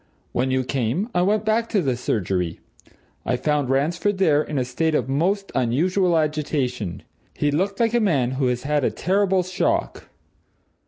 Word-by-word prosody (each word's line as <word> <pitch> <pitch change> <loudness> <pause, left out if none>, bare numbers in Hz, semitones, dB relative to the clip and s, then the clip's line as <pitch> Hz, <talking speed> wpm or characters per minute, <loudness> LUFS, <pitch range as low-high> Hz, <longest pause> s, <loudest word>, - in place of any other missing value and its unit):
When 130 +2 0
you 130 0 +1
came, 130 - -1
I 175 - +2
went 210 +4 +1
back 225 +1 +1
to 205 - +2
the 130 -3 0
surgery 95 -8 -2 0.6
I 125 - 0
found 145 -1 0
Ransford 165 +9 +1
there 155 -6 +3
in 155 -1 -4
a 130 - 0
state 155 +6 0
of - - 0
most 185 +9 0
unusual 170 +9 +2
agitation 140 - -2 0.3
he 145 - 0
looked 195 +7 -1
like 230 -1 +2
a 240 - +3
man 145 - +1
who 130 0 0
has 125 0 -1
had 145 0 0
a - - +3
terrible 190 0 +1
shock. 185 +1 -2
150 Hz, 170 wpm, -23 LUFS, 130-190 Hz, 0.6 s, there